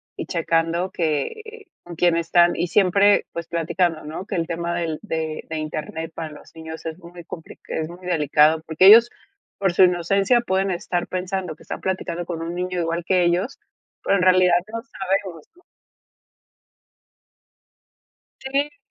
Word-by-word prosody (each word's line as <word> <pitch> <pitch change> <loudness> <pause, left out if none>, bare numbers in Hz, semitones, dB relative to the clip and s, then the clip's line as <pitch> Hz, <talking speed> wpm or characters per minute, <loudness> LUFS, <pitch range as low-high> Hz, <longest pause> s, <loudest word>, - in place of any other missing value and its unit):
y - - -6
checando 165 +1 0
que 435 - -3 0.2
con 175 -1 -10
quién 175 0 +3
están, 170 +1 +3
y 175 +2 -1
siempre 200 +2 +4
pues 170 -1 -6
platicando, 170 0 -1
¿no? 160 +6 -7
Que - - -4
el 165 -1 0
tema 170 0 -3
del 165 -3 -2
de 160 -6 -4
de 160 - -3
Internet 155 +1 -5
para 160 -1 -5
los 150 - -14
niños 160 0 -9
es 160 +2 -5
muy 170 0 -12
complic 160 0 -10
es 155 0 -3
muy 180 +1 -12
delicado. 155 -1 +3
Porque 160 +4 +3
ellos 230 +4 +9 0.5
por 195 -3 0
su 185 - +6
inocencia 195 +6 +3
pueden 195 -3 0
estar 175 0 -2
pensando 185 -2 -3
que - - -18
están - - -7
platicando 175 -2 -3
con 165 -2 -4
un 170 - -4
niño 180 0 -3
igual 170 +1 -2
que 180 -1 +3
ellos, 180 +9 0 0.4
pero 200 - +2
en - - 0
realidad 185 -1 +5 0.2
no 230 0 -4
sabemos, 190 - -3
¿no? 360 - -23 2.8
Sí. 285 +2 -2
175 Hz, 160 wpm, -22 LUFS, 165-190 Hz, 2.8 s, ellos